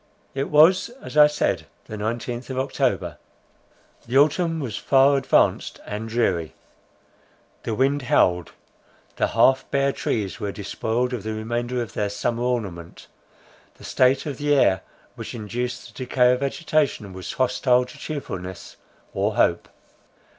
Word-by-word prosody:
It 135 +1 -2
was 165 +8 +5
as - - -10
I 150 0 +8
said, 95 - -1 0.2
the 110 - -7
nineteenth 120 +4 -4
of 130 - -4
October; 135 +1 -1 0.9
the 125 +3 +1
autumn 165 +3 +3
was 125 -8 -4
far 135 +1 +4
advanced 135 -1 +1
and 105 +2 -5
dreary. 95 -9 0 1.1
The 110 - -3
wind 140 +4 +1
howled; 90 -8 +2 0.7
the - - +2
half 130 0 +3
bare 140 0 +2
trees 105 -7 -3
were 100 - -3
despoiled 115 +5 -2
of 120 - -3
the 110 +1 -4
remainder 120 +3 -2
of 115 - -10
their 105 -1 -1
summer 115 +3 -2
ornament; 105 -9 -3 0.7
the - - -17
state 130 +1 +2
of 145 -4 -5
the 145 0 +2
air 95 -9 +3 0.3
which - - -8
induced 120 +2 -4
the 130 - -5
decay 125 0 +4
of 125 - +1
vegetation, 140 - -1
was 95 0 -6
hostile 125 -1 +2
to 125 - -13
cheerfulness 95 - -7 0.4
or - - 0
hope. - - +2
125 Hz, 145 wpm, -23 LUFS, 105-135 Hz, 1.1 s, I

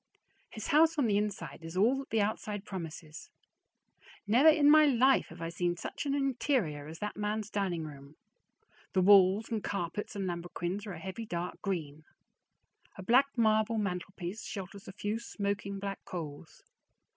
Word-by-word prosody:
His 215 - -7
house 320 +2 +5
on 285 - +3
the 210 -3 +2
inside 200 -8 -2
is 165 +2 -7
all 225 +7 +4
that 275 - -8
the 225 - +2
outside 210 -1 -3
promises. 165 - -7 1.0
Never 245 +9 +6
in 305 -2 +5
my 305 0 +8
life 265 0 +4
have 165 +1 -9
I 165 - -2
seen 175 +1 -1
such 290 - -5
an 280 - +1
interior 245 - 0
as 160 +1 -8
that 210 +3 -4
man's 210 0 -2
dining 185 -5 -1
room. 140 -1 -10 0.8
The 190 - +3
walls 195 +2 +6
and 220 -3 -2
carpets 200 +2 -3
and 195 -1 -2
lambrequins 175 +3 -4
are 195 - -5
a 165 - -8
heavy 190 +6 -6
dark 175 -2 -4
green. 155 -6 -4 0.9
A 190 - -7
black 255 +7 +5
marble 220 0 +3
mantelpiece 190 0 -4
shelters 195 0 -7
a - - -6
few 210 +2 -3
smoking 200 -3 -3
black 195 0 -5
coals. 160 -2 -8
200 Hz, 165 wpm, -31 LUFS, 175-225 Hz, 1.0 s, my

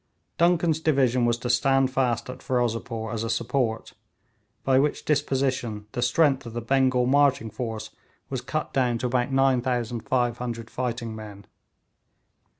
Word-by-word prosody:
Duncan's 170 -2 +3
division 130 -6 +2
was 120 0 +1
to 120 +1 -5
stand 135 +1 +3
fast 125 -3 0
at 125 - -8
Ferozepore 115 -3 -2
as 115 -1 -2
a 115 - -3
support, 115 -1 -1 0.7
by 130 -1 +4
which 145 +2 0
disposition 130 -7 0
the 120 - -3
strength 135 +1 +2
of 115 - -8
the 120 - -2
Bengal 130 +1 +2
marching 140 -4 +3
force 110 0 -5 0.4
was - - -4
cut - - -3
down 125 -3 +1
to 125 - -4
about 125 +2 0
9500 120 -2 0
fighting 115 -2 -3
men. 105 -2 -10
125 Hz, 140 wpm, -25 LUFS, 115-135 Hz, 0.7 s, by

